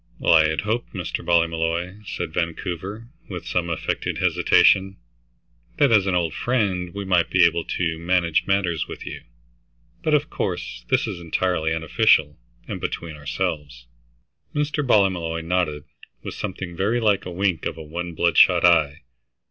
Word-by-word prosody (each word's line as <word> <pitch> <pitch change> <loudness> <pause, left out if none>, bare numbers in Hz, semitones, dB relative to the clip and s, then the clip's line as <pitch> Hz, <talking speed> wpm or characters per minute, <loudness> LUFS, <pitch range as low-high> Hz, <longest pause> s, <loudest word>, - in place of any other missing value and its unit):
"Well, - - +3
I 80 -1 +6
had 80 0 -1
hoped, 110 +3 -3
Mr. - - -4
Ballmolly," 85 +2 0
said 80 - -4
Vancouver, 90 +6 -4 0.2
with 90 -3 -6
some 85 -1 -1
affected 85 - -2
hesitation, 95 0 +3 0.8
"that 140 -4 +4
as 100 -3 +4
an 95 - +1
old 85 -3 0
friend, 100 -8 -1
we 100 +1 -6
might 90 -3 +2
be 90 -2 +5
able 85 0 +1
to 80 -2 -2
manage 85 -1 +1
matters 95 -5 0
with - - -8
you. - - -7 0.8
But, 155 -1 +2
of 150 +1 +1
course, 90 -3 -4
this - - +2
is - - -5
entirely 85 -1 -1
unofficial, 80 - +2 0.3
and - - -5
between 80 -2 -4
ourselves." 70 -3 -4 0.7
Mr. 150 0 0
Ballymolloy 90 -9 +2
nodded 80 -4 -1 0.4
with - - -6
something 95 -3 -6
very 105 +7 0
like 105 -5 +1
a - - -6
wink 90 -1 0
of - - -5
one 85 +2 -6
bloodshot 85 +1 +4
eye. 80 -4 +3
85 Hz, 150 wpm, -23 LUFS, 80-95 Hz, 0.8 s, I